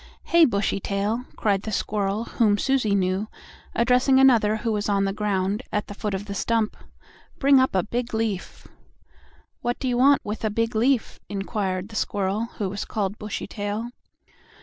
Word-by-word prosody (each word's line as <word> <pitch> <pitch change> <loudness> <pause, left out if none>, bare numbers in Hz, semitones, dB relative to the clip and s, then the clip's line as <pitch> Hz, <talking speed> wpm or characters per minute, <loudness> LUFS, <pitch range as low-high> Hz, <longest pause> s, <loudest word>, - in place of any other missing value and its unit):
"Hey, 335 -1 +5
Bushytail!" 200 +1 -1
cried 200 -3 +1
the 215 - -5
squirrel 205 +1 -1
whom 215 -3 +2
Susie 250 -5 +1
knew, 190 +2 0 0.5
addressing 250 +3 +4
another 230 -5 +5
who 225 +1 -2
was 210 -1 -1
on 200 -1 +2
the 195 - -1
ground 200 0 -1
at 210 -1 -1
the - - -8
foot 205 -1 -3
of 195 +2 -5
the 200 - -5
stump, 220 +2 0 0.6
"bring 275 -1 +5
up 260 -5 +2
a 185 - +3
big 235 +2 -3
leaf." 220 -4 -3 0.9
"What 240 0 -1
do 265 - -3
you 245 -1 +1
want 280 +2 +5
with 210 +2 -4
a 220 - +1
big 230 +3 -1
leaf?" 240 +2 +1
inquired 195 -1 -2
the 220 - -11
squirrel 200 +2 -1
who 205 - -1
was 195 +2 -4
called 205 -1 -3
Bushytail. 210 +2 -4
210 Hz, 170 wpm, -24 LUFS, 200-235 Hz, 0.9 s, Hey